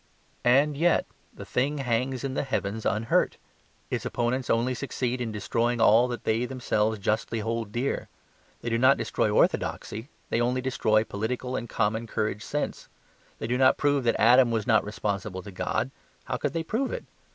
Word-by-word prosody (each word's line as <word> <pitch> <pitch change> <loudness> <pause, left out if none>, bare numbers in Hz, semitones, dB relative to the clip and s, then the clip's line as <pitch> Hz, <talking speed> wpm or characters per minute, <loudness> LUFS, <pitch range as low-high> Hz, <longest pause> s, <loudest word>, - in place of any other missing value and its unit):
And 140 +4 +4
yet 170 +4 +3 0.3
the - - -10
thing 140 +4 0
hangs 130 0 -1
in 135 -1 -2
the - - 0
heavens 110 -5 -2
unhurt. 115 +2 +1 0.5
Its - - -1
opponents 120 +1 -1
only 120 +3 +2
succeed 125 -1 -2
in 115 -2 -2
destroying 115 +3 0
all 115 +2 +6
that 120 -1 -5
they 115 +2 +1
themselves 110 -4 0
justly 110 +3 -1
hold 115 -1 -3
dear. 120 +5 -2 0.5
They 120 - -3
do 115 - +1
not 130 +2 +5
destroy - - 0
orthodoxy; 115 +6 0 0.2
they 115 - +2
only 125 +2 +1
destroy 110 -4 +2
political 125 +5 -3
and 120 - -4
common 110 +1 0
courage 105 -1 -2
sense. 150 - -3 0.5
They - - -5
do 125 +2 0
not 130 -1 +5
prove 145 -2 +2
that 115 - +2
Adam 125 +2 +6
was 110 -2 -1
not 110 -4 +4
responsible 100 -2 -3
to 100 - -9
God; 95 +7 -2 0.3
how 130 -1 -3
could - - -2
they 165 -1 -1
prove 230 +11 -1
it? - - -5
120 Hz, 175 wpm, -27 LUFS, 110-130 Hz, 0.5 s, all